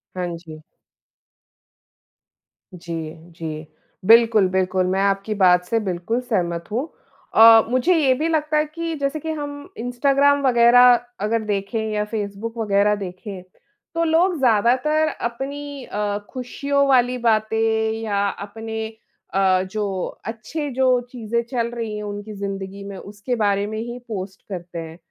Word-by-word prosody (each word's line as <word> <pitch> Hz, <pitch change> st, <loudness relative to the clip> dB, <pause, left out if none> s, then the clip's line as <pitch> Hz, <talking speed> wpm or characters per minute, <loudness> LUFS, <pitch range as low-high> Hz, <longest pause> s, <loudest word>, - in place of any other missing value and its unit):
हाँ 180 Hz, -1 st, -2 dB
जी। 160 Hz, -2 st, -12 dB, 2.1 s
जी, 165 Hz, -3 st, -6 dB, 0.2 s
जी। 160 Hz, -1 st, -6 dB, 0.4 s
बिल्कुल, 225 Hz, -2 st, +6 dB
बिल्कुल, 185 Hz, 0 st, +1 dB
मैं 190 Hz, +1 st, 0 dB
आपकी 195 Hz, +2 st, 0 dB
बात 180 Hz, -2 st, +5 dB
से 225 Hz, +5 st, 0 dB
बिल्कुल 190 Hz, +3 st, -2 dB
सहमत 175 Hz, -8 st, -1 dB
हूँ। 245 Hz, +7 st, -1 dB, 0.5 s
अ, 225 Hz, 0 st, +9 dB
मुझे 255 Hz, +9 st, +3 dB
ये 280 Hz, -5 st, +4 dB
भी 305 Hz, +5 st, -1 dB
लगता 305 Hz, -1 st, +1 dB
है 300 Hz, -, +2 dB
कि 330 Hz, +2 st, -5 dB
जैसे 285 Hz, +1 st, -2 dB
कि 320 Hz, +2 st, -4 dB
हम 285 Hz, 0 st, -7 dB
इंस्टाग्राम 275 Hz, +4 st, +2 dB
वगैरह 245 Hz, 0 st, +7 dB, 0.3 s
अगर 225 Hz, +1 st, 0 dB
देखें 205 Hz, +1 st, -2 dB
या 210 Hz, 0 st, 0 dB
फेसबुक 215 Hz, +1 st, -4 dB
वगैरह 210 Hz, -1 st, +2 dB
देखें, 190 Hz, 0 st, -7 dB, 0.5 s
तो 335 Hz, 0 st, 0 dB
लोग 335 Hz, +2 st, +2 dB
ज़्यादातर 260 Hz, +6 st, +3 dB
अपनी 280 Hz, +2 st, -5 dB
अ, 205 Hz, 0 st, -2 dB, 0.2 s
ख़ुशियों 280 Hz, +3 st, 0 dB
वाली 250 Hz, -2 st, +3 dB
बातें 220 Hz, -1 st, +1 dB
या 205 Hz, -2 st, 0 dB
अपने 220 Hz, +3 st, -6 dB, 0.5 s
अ, 190 Hz, -1 st, +3 dB
जो 200 Hz, -3 st, -2 dB, 0.2 s
अच्छे, 230 Hz, +8 st, -4 dB
जो 260 Hz, +1 st, +1 dB, 0.3 s
चीज़ें 235 Hz, -1 st, -2 dB
चल 235 Hz, -1 st, -2 dB
रही 230 Hz, -3 st, -4 dB
हैं 210 Hz, -, -5 dB
उनकी 205 Hz, +1 st, -6 dB
ज़िंदगी 195 Hz, -1 st, -5 dB
में, 200 Hz, -1 st, -7 dB
उसके 205 Hz, +6 st, -5 dB
बारे 205 Hz, -3 st, +1 dB
में 215 Hz, +1 st, -5 dB
ही 240 Hz, +2 st, -5 dB
पोस्ट 190 Hz, -3 st, -6 dB
करते 175 Hz, -2 st, -6 dB
हैं। 165 Hz, 0 st, -8 dB
220 Hz, 140 wpm, -22 LUFS, 195-255 Hz, 2.1 s, अ